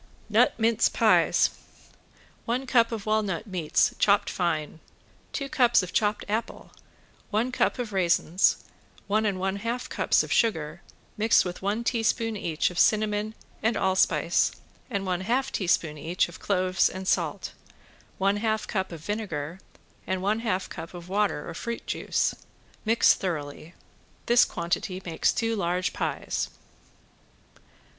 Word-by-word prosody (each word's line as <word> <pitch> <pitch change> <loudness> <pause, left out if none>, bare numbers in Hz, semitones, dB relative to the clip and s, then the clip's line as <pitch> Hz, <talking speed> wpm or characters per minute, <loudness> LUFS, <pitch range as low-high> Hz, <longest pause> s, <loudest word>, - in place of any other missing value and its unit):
~NUT - - +3
MINCE 225 0 +3
PIES~ - - +3 0.9
One 250 +3 -1
cup 235 -3 +3
of 220 -3 -4
walnut 215 -3 0
meats 180 -7 +1
chopped 200 0 +3
fine, 160 -3 -2 0.5
two 275 - -3
cups 245 -8 +3
of 185 - -7
chopped 210 0 +1
apple, 220 +3 -4 0.6
one 230 +4 0
cup 255 - +1
of 235 -4 -4
raisins, 180 -1 +2 0.4
one 215 +1 +1
and 195 -2 -1
one 190 +1 -1
half 230 +4 -3
cups - - +2
of - - -8
sugar 165 -8 0 0.4
mixed 220 0 +4
with 180 0 -5
one 205 +4 -1
teaspoon 225 -1 0
each 165 -4 -1
of 175 - -4
cinnamon 215 0 +2 0.3
and 225 0 +1
allspice 185 -2 +2 0.4
and 200 -5 -2
one 180 -1 -1
half 250 +7 0
teaspoon 170 -5 0
each 170 +5 0
of 175 - -12
cloves 185 -2 +2
and 190 0 -7
salt, - - -1 0.6
one 200 +1 +2
half 220 0 -1
cup 190 -3 -2
of 165 -3 -8
vinegar 185 -6 -4 0.5
and 185 0 -2
one 210 +3 +1
half 210 -5 -1
cup 165 +1 -8
of 175 0 -10
water 200 -6 0
or 170 - -6
fruit 235 +7 -5
juice. - - 0 0.5
Mix 225 +2 +5
thoroughly. 160 -2 -5 0.5
This 240 0 +5
quantity 180 +2 -3
makes 165 -2 +1
two 225 -1 -1
large 180 -2 -1
pies. - - -2
200 Hz, 140 wpm, -26 LUFS, 175-225 Hz, 0.9 s, Mix